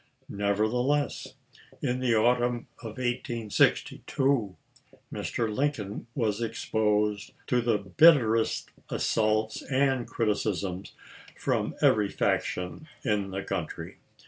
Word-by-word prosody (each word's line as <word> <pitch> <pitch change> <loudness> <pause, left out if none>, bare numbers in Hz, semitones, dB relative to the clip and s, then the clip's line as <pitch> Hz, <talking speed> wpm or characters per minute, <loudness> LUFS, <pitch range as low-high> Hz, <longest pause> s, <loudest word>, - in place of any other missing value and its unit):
Nevertheless, 110 +8 0 0.4
in 125 -2 -1
the 125 -3 +2
autumn 120 +1 +2
of 110 -3 -8
1862, 120 -1 0 0.6
Mr. 110 -3 -2
Lincoln 120 -8 -2
was 110 -4 0
exposed 105 -2 0
to 125 -1 +2
the 115 -2 +2
bitterest 115 - +4 0.2
assaults 110 0 0
and 130 -2 +1
criticisms 100 -4 -2 0.4
from - - -1
every 105 -2 +4
faction 90 +13 -1 0.2
in 105 -4 0
the 95 +1 -4
country. 90 -5 -5
110 Hz, 90 wpm, -28 LUFS, 105-125 Hz, 0.6 s, bitterest